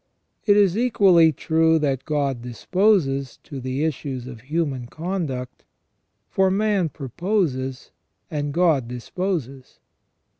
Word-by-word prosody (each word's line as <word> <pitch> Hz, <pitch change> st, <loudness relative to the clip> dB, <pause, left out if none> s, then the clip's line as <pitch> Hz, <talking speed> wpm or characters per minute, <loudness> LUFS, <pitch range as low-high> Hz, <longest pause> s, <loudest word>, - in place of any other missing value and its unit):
It 205 Hz, 0 st, +6 dB
is 195 Hz, -3 st, +4 dB
equally 195 Hz, -9 st, +5 dB
true 160 Hz, +2 st, +2 dB
that 135 Hz, -4 st, -1 dB
God 140 Hz, -5 st, -1 dB
disposes 135 Hz, -, +1 dB
of 135 Hz, -2 st, -5 dB
the 130 Hz, +3 st, -2 dB
issues 140 Hz, -5 st, -3 dB
of 120 Hz, -3 st, -9 dB
human 140 Hz, -3 st, -2 dB
conduct; 155 Hz, -6 st, -4 dB, 0.6 s
for 190 Hz, 0 st, +2 dB
man 200 Hz, -3 st, +1 dB
proposes 135 Hz, -, -2 dB, 0.4 s
and 145 Hz, -2 st, -2 dB
God 155 Hz, -6 st, +2 dB
disposes. 135 Hz, +1 st, -4 dB
150 Hz, 110 wpm, -23 LUFS, 130-180 Hz, 0.6 s, It